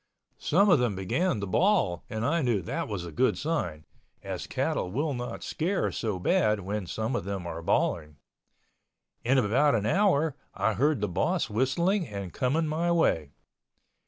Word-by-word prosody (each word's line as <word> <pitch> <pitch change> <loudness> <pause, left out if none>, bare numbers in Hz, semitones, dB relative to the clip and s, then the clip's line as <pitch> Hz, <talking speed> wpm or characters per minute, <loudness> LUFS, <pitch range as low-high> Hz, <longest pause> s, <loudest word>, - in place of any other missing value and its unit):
Some 195 +7 +3
of 165 - +6
them 120 -5 0
began 105 - 0
to - - -2
bawl 100 - +2
and 110 +1 -3
I 165 +4 +1
knew 120 - +1
that - - -3
was 100 -5 -4
a 85 - -7
good 130 +12 +1
sign, 85 - -2 0.4
as - - -5
cattle 90 - -1
will 145 - -1
not 120 -1 -5
scare 180 +5 -1
so 110 -5 -2
bad 105 +3 +2
when 100 0 -4
some 110 +7 -2
of - - -1
them 95 -1 -4
are 85 -1 -5
bawling. 75 -2 0 1.1
In 130 +3 +3
about 130 +4 +3
an 105 -2 0
hour 160 - +2 0.2
I 110 - +1
heard 140 +1 +1
the 105 - +1
boss 135 - 0
whistling 170 - +1
and 100 -4 -6
coming 145 +6 +1
my 160 +3 0
way. 80 - +2
120 Hz, 170 wpm, -28 LUFS, 95-155 Hz, 1.1 s, of